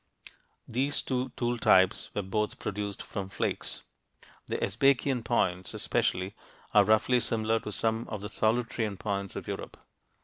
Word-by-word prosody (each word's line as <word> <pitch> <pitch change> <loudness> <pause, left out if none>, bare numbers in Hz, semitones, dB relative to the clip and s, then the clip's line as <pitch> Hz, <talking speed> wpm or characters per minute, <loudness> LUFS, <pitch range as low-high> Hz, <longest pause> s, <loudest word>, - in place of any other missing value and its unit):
These 135 +4 0
two 130 0 -1
tool 120 -1 0
types 95 -3 +4
were 105 - 0
both 105 +3 -1
produced 100 0 -4
from 95 -2 -5
flakes. - - -2 0.6
The - - -1
Sbaikian 130 +3 +2
points, 95 -6 0
especially, 95 +2 0 0.4
are - - +8
roughly 110 +3 +4
similar 115 -1 +1
to 105 - -6
some 110 +2 -1
of 105 -3 -5
the 105 - -5
Solutrean 110 -2 0
points 100 -2 -3
of - - -6
Europe. - - -5
110 Hz, 140 wpm, -29 LUFS, 100-120 Hz, 0.6 s, are